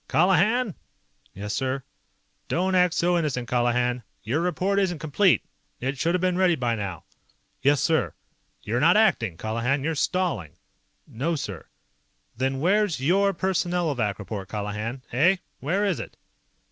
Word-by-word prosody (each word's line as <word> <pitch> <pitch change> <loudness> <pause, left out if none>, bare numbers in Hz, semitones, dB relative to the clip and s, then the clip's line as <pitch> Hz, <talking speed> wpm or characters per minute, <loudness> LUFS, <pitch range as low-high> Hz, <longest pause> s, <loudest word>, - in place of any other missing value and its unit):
"Colihan!" 195 +6 +3 0.6
"Yes, 105 +2 -4
sir?" 130 0 -1 0.6
"Don't 185 +2 0
act 180 -2 +3
so 175 0 +2
innocent, 125 -7 -2
Colihan. 120 0 +1 0.2
Your 130 +9 0
report 185 +3 +1
isn't 185 -4 0
complete. 160 +5 +2 0.4
It 135 +3 -2
should 170 +4 +1
have 180 - 0
been 185 0 +1
ready 180 -2 +4
by 120 -5 0
now." 100 -7 -4 0.6
"Yes, 140 0 +3
sir!" 160 +1 +1 0.5
"You're 115 +3 -1
not 170 +7 +5
ACTING, 115 - +2
Colihan. 115 - -1
You're 165 +2 0
stalling!" 160 - -1 0.5
"No, 150 +9 -2
sir." 100 - -6 0.7
"Then 130 +2 -1
where's 195 +1 +2
your 195 +8 +3
Personnelovac 170 - 0
report, 100 -1 -6
Colihan? 105 +4 -4
Eh? 165 +10 +4 0.2
Where 185 +10 0
is 195 -5 0
it?" - - -8
145 Hz, 140 wpm, -25 LUFS, 120-180 Hz, 0.7 s, not